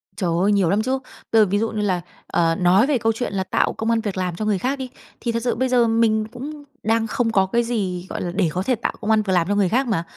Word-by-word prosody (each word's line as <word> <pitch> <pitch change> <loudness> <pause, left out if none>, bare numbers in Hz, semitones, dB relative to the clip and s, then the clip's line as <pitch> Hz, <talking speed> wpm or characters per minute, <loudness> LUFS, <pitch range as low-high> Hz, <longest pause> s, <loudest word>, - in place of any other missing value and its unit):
Trời 185 -4 -1
ơi! 205 - +3
Nhiều 195 -4 +3
lắm 205 +4 +2
chứ. 260 +3 -1 0.3
Bây 225 - +6
giờ - - +6
ví 200 +1 0
dụ 225 +1 0
như 215 -1 -2
là, 185 -4 0 0.3
ờ, 165 -1 +1
nói 185 +8 +4
về 290 - +2
câu 225 -1 +1
chuyện 230 -1 -4
là 190 -1 0
tạo - - 0
công 220 - -3
ăn 230 -1 +2
việc 205 -4 -4
làm 180 -2 -2
cho 215 - -3
người 210 -2 +1
khác 270 +7 -1
đi, 260 -1 -5 0.3
thì 235 - -1
thật 230 0 -2
sự 245 - 0
bây 260 +1 0
giờ 245 -2 +4
mình 225 -1 +2
cũng 290 +4 -8 0.2
đang 225 +1 +1
không 230 +1 0
có 195 -3 +3
cái 235 +5 +1
gì, 190 -7 -2
gọi - - -4
là, 175 - -3
để 185 -5 +2
có 185 - -1
thể 255 +5 +1
tạo 235 - -3
công 220 0 0
ăn 220 - +4
việc 195 -3 -1
làm 175 -2 +2
cho 205 - +1
người 200 -3 +2
khác 255 +6 +1
mà. 185 -7 0
215 Hz, 305 wpm, -22 LUFS, 190-235 Hz, 0.3 s, Bây